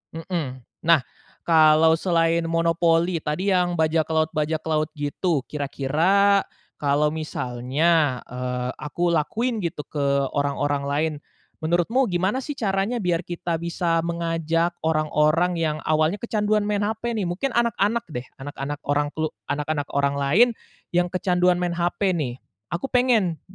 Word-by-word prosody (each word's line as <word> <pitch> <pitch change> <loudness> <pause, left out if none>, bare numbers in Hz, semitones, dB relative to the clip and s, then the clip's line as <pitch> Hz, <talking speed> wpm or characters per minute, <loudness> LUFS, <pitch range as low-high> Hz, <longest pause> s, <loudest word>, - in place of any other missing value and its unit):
Mhm. 155 -7 -4 0.2
Nah, 160 -6 +5 0.4
kalau 160 0 +5
selain 165 -2 +1
monopoli 165 +1 +2
tadi, 180 +7 -1
yang 180 -1 +2
bajak 160 -1 +1
laut-bajak 155 -1 0
laut 155 -1 0
gitu 145 0 -1
kira-kira 165 +8 +2 0.3
kalau 145 +1 +2
misalnya, 145 0 0
eee, 125 0 -4
aku 170 +4 -1
lakuin 220 +9 0
gitu 170 -5 -3
ke 140 -2 0
orang-orang 145 0 -1
lain. 155 +2 0 0.4
Menurutmu 175 +11 +1
gimana 190 +4 0
sih, 280 +3 -4
caranya 210 0 -1
biar 175 -1 0
kita 170 -1 -3
bisa 170 0 -1
mengajak 165 0 -1
orang-orang 155 +2 +2
yang 155 -2 0
awalnya 155 +5 +2
kecanduan 215 -2 +1
main 205 0 0
HP, 225 +2 -2
nih? 205 - -1
Mungkin 180 +11 -2
anak-anak 235 -2 +1
deh, 125 - -3 0.2
anak-anak 140 +1 -5
orang 145 +1 +1
klu 160 +1 -2 0.2
anak-anak 145 0 -2
orang 140 0 +1
lain 175 - +5 0.5
yang 175 0 +2
kecanduan 180 -1 +2
main 175 -1 -1
HP, 175 +2 0
nih. 130 -7 -2 0.3
Aku 175 +8 -3
pengen 225 -10 +2
165 Hz, 135 wpm, -23 LUFS, 150-180 Hz, 0.5 s, Nah